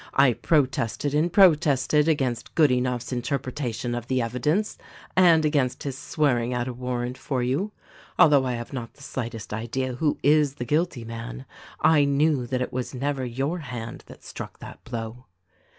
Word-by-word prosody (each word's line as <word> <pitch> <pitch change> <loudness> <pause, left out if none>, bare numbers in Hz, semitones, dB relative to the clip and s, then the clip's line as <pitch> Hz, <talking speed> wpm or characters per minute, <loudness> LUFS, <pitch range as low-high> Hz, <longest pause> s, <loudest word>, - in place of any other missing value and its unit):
I 135 -2 +5
protested 135 0 0
and 155 +4 +2
protested 150 -5 +4
against 130 -7 -1
Good 155 -4 +5
enough's 125 -1 -1
interpretation 125 -1 -3
of 120 -1 -4
the 130 -1 +1
evidence 125 - -1 0.4
and 170 -4 +5
against 140 -4 0
his 140 -3 -3
swearing 125 -4 0
out 120 0 -1
a 130 - -3
warrant 125 0 -4
for 130 -4 -2
you. 145 +12 -1 0.5
Although 145 -4 +6
I 125 - -1
have 120 +3 -6
not 120 -3 -6
the 140 - -15
slightest 115 -6 -5
idea 120 +4 -2
who 145 +4 0
is 145 -1 +4
the 125 - -5
guilty 150 -1 0
man, 110 - -7 0.4
I 150 -3 +5
knew 140 -2 +2
that 125 0 -1
it - - -6
was 130 +1 -4
never 135 +1 -2
your 135 +8 -2
hand 120 -6 -7
that - - -14
struck - - -8
that - - -11
blow." 115 +2 -6
130 Hz, 165 wpm, -25 LUFS, 120-150 Hz, 0.5 s, Although